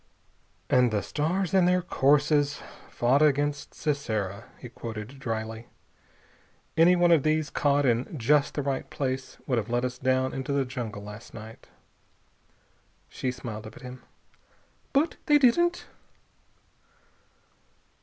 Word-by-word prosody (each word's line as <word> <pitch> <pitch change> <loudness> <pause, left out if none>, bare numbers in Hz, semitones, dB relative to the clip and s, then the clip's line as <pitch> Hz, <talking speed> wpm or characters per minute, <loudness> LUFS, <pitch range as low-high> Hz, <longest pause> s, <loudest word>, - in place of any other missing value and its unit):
"And 125 -1 +4
the 105 -2 -1
stars 175 +5 -1
in 190 -2 +5
their 180 0 +2
courses 145 -1 +2 0.3
fought 130 +4 +2
against 145 -1 +1
Sisera," 110 - -2
he - - -9
quoted 115 +2 -8
dryly. 115 -2 -4 1.1
"Any 170 +2 +6
one 175 -1 +4
of 165 -4 +6
these, 155 0 0
caught 145 0 +2
in 125 +5 0
just 140 +4 +2
the 145 - -1
right 135 -1 -2
place, 130 -1 -3
would 125 -3 +1
have 110 - -5
let 120 +1 0
us 125 0 -5
down 130 0 +1
into 135 +1 -3
the 140 -1 +1
jungle 120 -5 -6
last 105 +2 -10
night." 110 0 -11 1.4
She 130 - -3
smiled 115 -4 -7
up 110 - -12
at - - -14
him. 125 0 -9 0.9
"But 300 +4 +1
they 295 -1 +6
didn't." 345 +7 +3
135 Hz, 135 wpm, -27 LUFS, 115-150 Hz, 1.4 s, Any